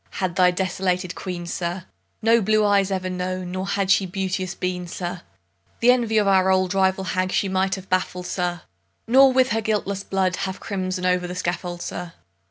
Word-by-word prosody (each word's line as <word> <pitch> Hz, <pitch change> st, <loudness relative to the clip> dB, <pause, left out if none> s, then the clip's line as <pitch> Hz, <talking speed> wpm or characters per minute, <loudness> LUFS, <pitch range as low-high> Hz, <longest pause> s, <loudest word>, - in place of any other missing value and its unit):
had 185 Hz, -3 st, -2 dB
thy 180 Hz, -1 st, +5 dB
desolated 185 Hz, 0 st, -1 dB
Queen, 180 Hz, -2 st, -5 dB
sir, 175 Hz, +1 st, -4 dB, 0.4 s
No 230 Hz, +1 st, +5 dB
blue 215 Hz, +1 st, +3 dB
eyes 200 Hz, -1 st, +3 dB
ever 185 Hz, -1 st, -2 dB
known, 185 Hz, 0 st, -3 dB
nor 185 Hz, +1 st, -3 dB
had 200 Hz, -1 st, 0 dB
she 190 Hz, 0 st, +3 dB
beauteous 185 Hz, -1 st, -3 dB
been, 180 Hz, -1 st, -3 dB
sir, 175 Hz, +1 st, -5 dB, 0.6 s
The 240 Hz, +1 st, +6 dB
envy 235 Hz, -3 st, +1 dB
of 210 Hz, -2 st, +3 dB
our 190 Hz, -1 st, +4 dB
old 185 Hz, -1 st, +2 dB
rival 190 Hz, 0 st, +2 dB
hag 185 Hz, 0 st, -1 dB
she 195 Hz, -, +1 dB
might 190 Hz, 0 st, 0 dB
have 190 Hz, -1 st, -10 dB
baffled, 180 Hz, -1 st, -1 dB
sir, 175 Hz, -2 st, -2 dB, 0.4 s
Nor 265 Hz, +3 st, +7 dB
with 260 Hz, 0 st, +3 dB
her 225 Hz, 0 st, 0 dB
guiltless 200 Hz, -2 st, -1 dB
blood 190 Hz, -2 st, 0 dB
have 190 Hz, 0 st, -3 dB
crimson'd 185 Hz, -2 st, -3 dB
o'er 180 Hz, 0 st, +3 dB
the 180 Hz, -, -6 dB
scaffold, 175 Hz, 0 st, -3 dB
sir. 175 Hz, -1 st, -6 dB
185 Hz, 185 wpm, -23 LUFS, 180-195 Hz, 0.6 s, Nor